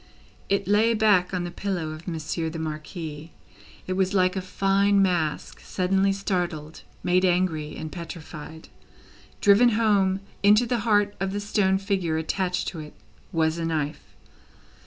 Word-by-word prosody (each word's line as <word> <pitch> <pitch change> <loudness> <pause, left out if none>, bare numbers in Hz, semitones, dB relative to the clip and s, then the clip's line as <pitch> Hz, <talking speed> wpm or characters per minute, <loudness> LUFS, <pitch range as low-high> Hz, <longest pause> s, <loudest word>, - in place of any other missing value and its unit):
It 200 -1 +1
lay 220 +3 +3
back 205 -4 +3
on 180 -2 -2
the 175 - -5
pillow 175 -4 -3
of 155 +3 -10
Monsieur 160 0 -3
the 165 - -6
Marquis. 155 0 -6 0.5
It 185 - -2
was 190 +1 0
like 185 0 +3
a 190 - -1
fine 195 +2 +2
mask, 175 -5 0
suddenly 190 +1 +1
startled, 175 -6 -3 0.2
made 180 +1 +2
angry, 175 -4 +1
and 155 -1 -6
petrified. 160 -2 -9 0.7
Driven 205 +4 +6
home 195 -4 +2 0.2
into 210 +4 +5
the 240 0 0
heart 205 -2 +2
of 195 0 -2
the 205 - -1
stone 205 -2 +1
figure 190 -5 -1
attached 180 +3 -1
to 170 - -8
it, 150 -1 -10 0.4
was 160 0 +1
a 165 - -2
knife. 155 -2 -3
185 Hz, 150 wpm, -25 LUFS, 160-200 Hz, 0.7 s, Driven